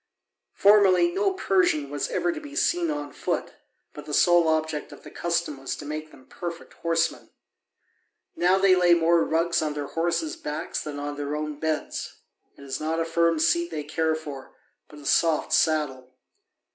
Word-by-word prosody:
Formerly 205 Hz, -, +5 dB
no 390 Hz, +1 st, +1 dB
Persian 180 Hz, -, +1 dB
was 145 Hz, -1 st, -2 dB
ever 350 Hz, -, 0 dB
to 315 Hz, -2 st, -6 dB
be 295 Hz, -1 st, -10 dB
seen 340 Hz, +1 st, +1 dB
on 295 Hz, -1 st, -4 dB
foot, -, -, -3 dB, 0.4 s
but -, -, -10 dB
the -, -, -2 dB
sole 175 Hz, -2 st, +5 dB
object 155 Hz, -1 st, -1 dB
of -, -, -13 dB
the -, -, -11 dB
custom 170 Hz, -4 st, -2 dB
was 135 Hz, -, -4 dB
to -, -, -9 dB
make 155 Hz, +1 st, -5 dB
them 130 Hz, -, -18 dB
perfect 170 Hz, -1 st, -7 dB
horsemen. 165 Hz, -1 st, -1 dB, 1.1 s
Now 180 Hz, +2 st, +3 dB
they 190 Hz, -1 st, +5 dB
lay 175 Hz, -1 st, +5 dB
more 170 Hz, 0 st, +3 dB
rugs 165 Hz, +1 st, +1 dB
on 150 Hz, -1 st, -2 dB
their 145 Hz, -1 st, -3 dB
horses' 170 Hz, -, -1 dB
backs 150 Hz, -, -4 dB
than 150 Hz, -2 st, -6 dB
on 145 Hz, 0 st, -5 dB
their 145 Hz, 0 st, -3 dB
own 150 Hz, -1 st, -4 dB
beds; 160 Hz, -1 st, -3 dB, 0.4 s
it -, -, -13 dB
is 135 Hz, -1 st, -4 dB
not 160 Hz, +1 st, -1 dB
a 165 Hz, -, 0 dB
firm 165 Hz, 0 st, +2 dB
seat 340 Hz, -, +2 dB
they 150 Hz, -, -4 dB
care 160 Hz, +1 st, 0 dB
for, 145 Hz, -4 st, -9 dB, 0.3 s
but 150 Hz, -, -14 dB
a 145 Hz, -, -13 dB
soft 160 Hz, +2 st, +2 dB
saddle. 140 Hz, -5 st, +1 dB
165 Hz, 180 wpm, -25 LUFS, 150-180 Hz, 1.1 s, Formerly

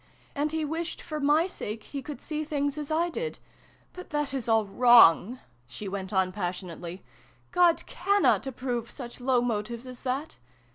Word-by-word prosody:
And 295 Hz, 0 st, -1 dB
he 320 Hz, -1 st, -1 dB
wished, 325 Hz, +2 st, -3 dB
for 305 Hz, -2 st, -5 dB
my 295 Hz, +3 st, +4 dB
sake, 220 Hz, -, -5 dB
he 280 Hz, -, -6 dB
could 290 Hz, +2 st, -8 dB
see 310 Hz, 0 st, -3 dB
things 285 Hz, -2 st, -1 dB
as 300 Hz, -2 st, -5 dB
I 335 Hz, +2 st, +1 dB
did. 470 Hz, +6 st, -4 dB, 0.6 s
But 365 Hz, -, -10 dB
that 295 Hz, -2 st, -1 dB
is 255 Hz, -4 st, -3 dB
all 225 Hz, -1 st, +4 dB
wrong! 235 Hz, 0 st, +6 dB, 0.2 s
" -, -, -35 dB
she 200 Hz, +11 st, -7 dB
went 190 Hz, -1 st, -4 dB
on 190 Hz, -2 st, +2 dB
passionately. 180 Hz, -2 st, -5 dB, 0.2 s
" -, -, -33 dB
God 350 Hz, -2 st, +4 dB
cannot 395 Hz, -6 st, +2 dB
approve 245 Hz, -3 st, -3 dB
such 245 Hz, -2 st, -9 dB
low 250 Hz, -1 st, +3 dB
motives 230 Hz, +1 st, -3 dB
as 250 Hz, -1 st, -10 dB
that 270 Hz, +4 st, -3 dB
260 Hz, 180 wpm, -28 LUFS, 215-305 Hz, 0.6 s, wrong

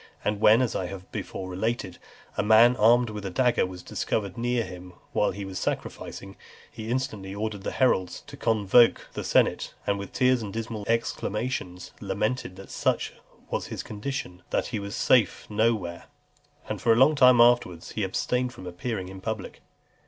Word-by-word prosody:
And 105 Hz, 0 st, 0 dB
when, 110 Hz, +4 st, +6 dB
as 120 Hz, -, -2 dB
I 90 Hz, -, -1 dB
have 95 Hz, 0 st, -9 dB
before 95 Hz, -, -5 dB
related, 95 Hz, 0 st, -3 dB, 0.4 s
a -, -, +1 dB
man 110 Hz, +4 st, +6 dB
armed 120 Hz, +1 st, +4 dB
with 105 Hz, -1 st, -6 dB
a 95 Hz, -, -3 dB
dagger 120 Hz, +1 st, +2 dB
was 90 Hz, -1 st, -9 dB
discovered 100 Hz, -4 st, -2 dB
near 120 Hz, 0 st, 0 dB
him 90 Hz, -2 st, -10 dB, 0.2 s
while -, -, +2 dB
he 100 Hz, -1 st, -5 dB
was 95 Hz, -1 st, -5 dB
sacrificing, 95 Hz, 0 st, -5 dB, 0.3 s
he 110 Hz, 0 st, -7 dB
instantly 105 Hz, -6 st, -3 dB
ordered 105 Hz, -1 st, -3 dB
the -, -, -3 dB
heralds 95 Hz, -9 st, +1 dB
to -, -, -10 dB
convoke 115 Hz, +1 st, +3 dB
the -, -, -4 dB
senate, -, -, +1 dB
and 100 Hz, 0 st, 0 dB
with 100 Hz, -, -7 dB
tears 125 Hz, -1 st, +3 dB
and 105 Hz, -2 st, -5 dB
dismal 110 Hz, -2 st, -4 dB
exclamations, 105 Hz, -4 st, -2 dB
lamented 105 Hz, 0 st, -2 dB
that 95 Hz, +1 st, -11 dB
such -, -, 0 dB, 0.4 s
was -, -, -2 dB
his -, -, -5 dB
condition, 110 Hz, -, -5 dB
that -, -, 0 dB
he 110 Hz, -, 0 dB
was 100 Hz, 0 st, -5 dB
safe 115 Hz, -7 st, +3 dB
no 110 Hz, +2 st, +3 dB
where; 85 Hz, -4 st, -7 dB, 0.6 s
and -, -, -4 dB
for 115 Hz, -, +3 dB
a -, -, +6 dB
long 135 Hz, +6 st, +6 dB
time 125 Hz, -4 st, +6 dB
afterwards 120 Hz, -8 st, +3 dB
he 110 Hz, -, -2 dB
abstained 125 Hz, +6 st, -1 dB
from 95 Hz, -, -11 dB
appearing 95 Hz, +2 st, -4 dB
in 95 Hz, 0 st, -9 dB
public. 110 Hz, -1 st, -5 dB
105 Hz, 180 wpm, -26 LUFS, 95-120 Hz, 0.6 s, when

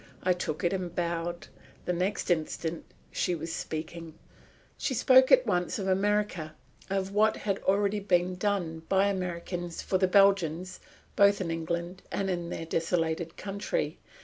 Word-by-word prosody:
I 185 Hz, -, +4 dB
took 165 Hz, -1 st, -4 dB
it 175 Hz, -, +2 dB
and 180 Hz, -3 st, -3 dB
bowed. 170 Hz, 0 st, -2 dB, 0.4 s
The 180 Hz, -, 0 dB
next 180 Hz, +2 st, -1 dB
instant 160 Hz, 0 st, -2 dB, 0.3 s
she 180 Hz, -, 0 dB
was 165 Hz, +1 st, -5 dB
speaking. 160 Hz, +1 st, -5 dB, 0.6 s
She 260 Hz, -, -2 dB
spoke 260 Hz, +2 st, +6 dB
at -, -, +7 dB
once 180 Hz, +8 st, 0 dB
of 195 Hz, -2 st, -3 dB
America, 190 Hz, -4 st, 0 dB, 0.3 s
of 195 Hz, 0 st, -1 dB
what 215 Hz, +1 st, +3 dB
had 200 Hz, -2 st, -2 dB
already 200 Hz, +1 st, +1 dB
been 185 Hz, -2 st, +1 dB
done 180 Hz, -4 st, -1 dB
by 195 Hz, +1 st, +4 dB
Americans 175 Hz, -2 st, -4 dB
for 185 Hz, -, 0 dB
the 185 Hz, -, +3 dB
Belgians 185 Hz, -2 st, +3 dB, 0.4 s
both 200 Hz, 0 st, +5 dB
in 175 Hz, -3 st, -2 dB
England 170 Hz, +2 st, -3 dB
and 195 Hz, -1 st, -1 dB
in 175 Hz, -1 st, -3 dB
their 165 Hz, -, -4 dB
desolated 165 Hz, 0 st, -1 dB
country. 200 Hz, -, -3 dB
180 Hz, 150 wpm, -29 LUFS, 170-195 Hz, 0.6 s, at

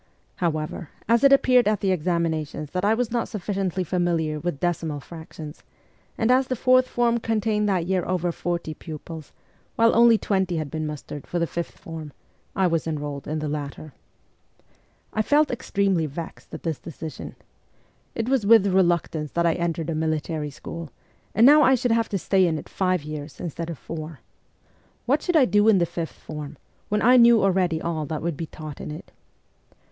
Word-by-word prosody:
However, 155 Hz, -1 st, -2 dB, 0.2 s
as 230 Hz, +2 st, +3 dB
it 275 Hz, -, +7 dB
appeared 255 Hz, -4 st, +5 dB
at 210 Hz, -2 st, +2 dB
the 195 Hz, -, +1 dB
examinations 160 Hz, -4 st, -1 dB
that 180 Hz, +1 st, -2 dB
I 210 Hz, +2 st, +3 dB
was 240 Hz, -1 st, -1 dB
not 235 Hz, -1 st, 0 dB
sufficiently 190 Hz, -3 st, -2 dB
familiar 170 Hz, -3 st, 0 dB
with 155 Hz, -2 st, -3 dB
decimal 165 Hz, -4 st, -1 dB
fractions, 160 Hz, 0 st, -10 dB, 0.6 s
and 225 Hz, +2 st, +2 dB
as 260 Hz, +1 st, +4 dB
the 255 Hz, -, -1 dB
fourth 255 Hz, +1 st, +4 dB
form 235 Hz, -1 st, +1 dB
contained 215 Hz, -2 st, 0 dB
that 180 Hz, -4 st, +1 dB
year 185 Hz, 0 st, 0 dB
over 180 Hz, -1 st, 0 dB
forty 170 Hz, -2 st, -3 dB
pupils, 155 Hz, 0 st, -9 dB, 0.4 s
while 230 Hz, 0 st, +4 dB
only 235 Hz, -1 st, +6 dB
twenty 190 Hz, -5 st, 0 dB
had 155 Hz, -3 st, -4 dB
been 155 Hz, -1 st, -3 dB
mustered 150 Hz, -1 st, -7 dB
for 175 Hz, -, -3 dB
the 170 Hz, -, +1 dB
fifth 170 Hz, +1 st, -5 dB
form, 160 Hz, -3 st, -8 dB, 0.4 s
I 190 Hz, -, +2 dB
was 165 Hz, -2 st, 0 dB
enrolled 145 Hz, -3 st, -4 dB
in 155 Hz, -, -2 dB
the 155 Hz, 0 st, -3 dB
latter. 145 Hz, 0 st, -5 dB, 1.2 s
I 215 Hz, -, +1 dB
felt 295 Hz, +6 st, +3 dB
extremely 195 Hz, -8 st, 0 dB
vexed 160 Hz, +3 st, -8 dB
at -, -, -8 dB
this 160 Hz, -4 st, -2 dB
decision. 160 Hz, -1 st, -8 dB, 0.8 s
It 225 Hz, -, -2 dB
was 265 Hz, -3 st, +2 dB
with 215 Hz, -1 st, +6 dB
reluctance 175 Hz, -5 st, +1 dB
that 170 Hz, 0 st, +1 dB
I 165 Hz, -, +4 dB
entered 165 Hz, -1 st, -2 dB
a -, -, -1 dB
military 155 Hz, -1 st, -2 dB
school, 165 Hz, +3 st, -8 dB, 0.5 s
and 225 Hz, -, +6 dB
now 295 Hz, +3 st, +8 dB
I 265 Hz, -2 st, +6 dB
should 245 Hz, -1 st, 0 dB
have 230 Hz, 0 st, +2 dB
to 200 Hz, -, -1 dB
stay 190 Hz, 0 st, +2 dB
in 160 Hz, -2 st, 0 dB
it -, -, -8 dB
five 185 Hz, -4 st, 0 dB
years 150 Hz, -1 st, -7 dB
instead 170 Hz, 0 st, -5 dB
of 165 Hz, -, -5 dB
four. 155 Hz, -1 st, -7 dB, 0.8 s
What 280 Hz, +5 st, +2 dB
should 355 Hz, -, -1 dB
I 290 Hz, -5 st, +6 dB
do 205 Hz, -2 st, +3 dB
in 220 Hz, -3 st, +6 dB
the 175 Hz, -, +3 dB
fifth 170 Hz, -1 st, -5 dB
form, 150 Hz, -2 st, -8 dB, 0.3 s
when 210 Hz, 0 st, 0 dB
I 250 Hz, +3 st, +7 dB
knew 235 Hz, -2 st, +6 dB
already 180 Hz, -4 st, +2 dB
all 160 Hz, -3 st, -3 dB
that 155 Hz, +1 st, -4 dB
would 170 Hz, -2 st, -1 dB
be 165 Hz, +2 st, -5 dB
taught 155 Hz, -1 st, -9 dB
in -, -, -6 dB
it? 155 Hz, +3 st, -9 dB
175 Hz, 185 wpm, -24 LUFS, 155-215 Hz, 1.2 s, now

